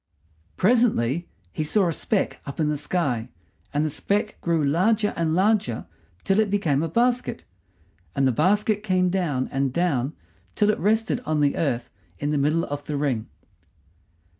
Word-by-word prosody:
Presently 180 - +2 0.2
he 155 - -2
saw 190 +5 +2
a 165 - 0
speck 205 +5 -1
up 140 - -7
in 155 -1 +2
the 150 - 0
sky, 140 -6 -1 0.4
and 150 +2 0
the - - 0
speck 205 +7 -1
grew 165 -2 +1
larger 205 +9 +2
and 165 -1 0
larger 190 - +1 0.4
till 195 +2 +2
it 215 -2 +2
became 165 -9 +1
a 165 - -1
basket, 245 +6 0 0.7
and 135 -1 +3
the - - +3
basket 205 - +2
came 185 -3 +1
down 155 -9 0
and 135 -1 0
down 145 -4 0 0.4
till 210 -1 +3
it - - -4
rested 220 +5 +1
on 155 -6 0
the 145 -1 +2
earth 125 -6 -1 0.3
in 145 +1 -2
the 150 - +1
middle 155 +4 +2
of 145 0 -5
the 150 - -3
ring. 135 -6 -1
165 Hz, 165 wpm, -24 LUFS, 145-205 Hz, 0.7 s, and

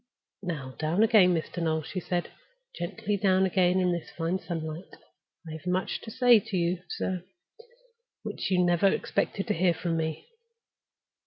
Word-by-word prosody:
"Now 150 -9 -5
down 160 +7 +2
again, 210 -6 +6
Mr. 165 +2 -3
Noel," 160 -1 0
she 185 - -4
said. 175 0 -2 0.4
"Gently 200 +4 -2
down 190 -1 +3
again, 185 0 +3
in 180 -1 +2
this 170 -1 -3
fine 170 +3 -2
sunlight. 165 -1 -6 0.5
I - - -6
have 160 +2 -8
much 180 +1 -1
to - - -8
say 245 0 +5
to 210 -2 -4
you, 170 +1 0
sir, 185 -2 -3 1.0
which - - -4
you 180 -1 +3
never 175 +2 +3
expected 195 0 0
to - - 0
hear 175 0 +2
from 165 -1 -2
me. 160 - -3
180 Hz, 160 wpm, -28 LUFS, 165-190 Hz, 1.0 s, again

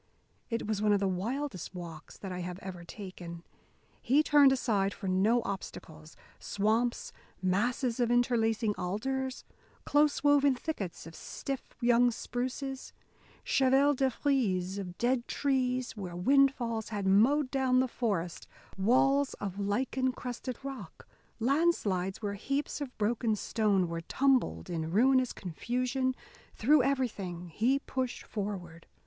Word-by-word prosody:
It 230 -1 -2
was 210 -1 -1
one 210 -1 +4
of 200 - +3
the 195 - +1
wildest 200 - -3
walks 165 -3 -9
that 195 - -7
I 180 - -4
have 180 0 -5
ever 180 -2 -7
taken. 175 -2 -9 0.6
He 275 +5 +3
turned 290 -3 +6
aside 210 -7 +1
for 195 - -6
no 210 +6 +3
obstacles; 160 -5 -7 0.2
swamps, 220 +4 0 0.3
masses 230 +7 0
of 240 -1 +2
interlacing 230 -2 +2
alders, 260 +8 -3 0.4
close 295 0 +3
woven 285 -2 +5
thickets 230 - -5
of 165 - -10
stiff 270 +9 -6
young 245 0 +5
spruces, 260 +3 -4 0.5
chevaux 270 +2 +4
de 265 -1 +2
frise 200 -10 0
of 180 -2 -7
dead 245 0 +1
trees 255 -3 0
where 185 -5 -6
wind 275 +9 +5
falls 230 -3 -3
had 205 -2 -3
mowed 255 +9 +4
down 260 -2 +2
the 260 - +2
forest, 200 -9 -2 0.3
walls 270 +7 +3
of 195 -1 -5
lichen 255 +6 0
crusted 250 0 -5
rock, 260 -11 -8 0.3
landslides 225 - +1
where 200 -1 -1
heaps 275 +9 -2
of 265 -3 -6
broken 220 +1 +1
stone 205 -4 +1
were 165 0 -4
tumbled 250 - +1
in 160 -2 -3
ruinous 255 +6 +3
confusion 250 +8 -2 0.4
through 285 +5 +4
everything 210 -10 -2
he 235 +11 +2
pushed 260 -2 -3
forward. 185 -6 -6
235 Hz, 135 wpm, -31 LUFS, 190-265 Hz, 0.6 s, turned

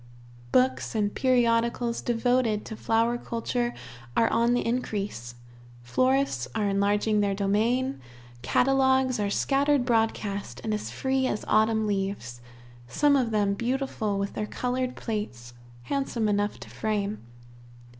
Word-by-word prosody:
Books 130 0 +2
and 205 -2 0
periodicals 235 -2 +1
devoted 240 -2 +1
to 220 - -6
flower 230 +2 +1
culture 240 +1 -2 0.5
are 230 - +4
on 235 +1 +3
the 245 - -1
increase; 205 - -3 0.5
florists 255 - +1
are 210 - +1
enlarging 205 +2 +2
their 200 -1 +1
domain; 225 +7 +1 0.4
catalogues 265 - +2
are 205 -1 0
scattered 275 +4 +2
broadcast, 210 - -1
and 220 - -1
as 210 - -3
free 265 0 0
as 210 - -3
autumn 220 0 +3
leaves, 195 - -3 0.5
some 285 - +3
of 255 -4 +2
them 205 -2 +1
beautiful 235 -2 -2
with 200 0 -2
their 210 - -3
colored 250 +2 -2
plates, 125 - -5 0.3
handsome 255 - -1
enough 205 0 0
to - - -10
frame. 210 -1 -2
225 Hz, 125 wpm, -27 LUFS, 200-250 Hz, 0.5 s, are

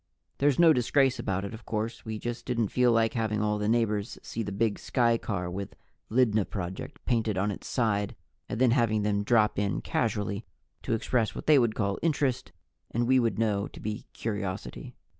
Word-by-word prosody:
There's 140 -1 +3
no 170 -2 +7
disgrace 130 +1 +2
about 95 -3 -1
it, 100 - -6
of 110 +1 -9
course; 110 +1 -3
we 110 -1 -4
just 120 +2 -5
didn't 120 -5 0
feel 125 -1 +3
like 115 -1 +3
having 110 -3 0
all 105 0 0
the 105 0 0
neighbors 110 -2 0
see 115 - -4
the 105 - -3
big 105 +1 0
skycar 115 -7 0
with 100 +2 -5 0.3
LYDNA 110 -4 +3
PROJECT 95 -2 -6
painted 110 -5 +1
on 100 +2 +1
its 100 - -7
side, 105 -5 0 0.3
and - - -3
then 125 -2 +5
having 115 -4 +2
them 100 -1 +1
drop 105 -2 +3
in 100 -1 0
casually 105 -2 -1 0.4
to - - -2
express 115 0 0
what - - -6
they 150 -2 +6
would 115 -3 +1
call 100 -2 -1
interest 140 -6 0 0.4
and 120 +1 0
we 130 0 +5
would 115 -5 +1
know 105 -2 +1
to - - -12
be 105 0 -5
curiosity. 100 -4 -5
110 Hz, 190 wpm, -28 LUFS, 105-120 Hz, 0.4 s, no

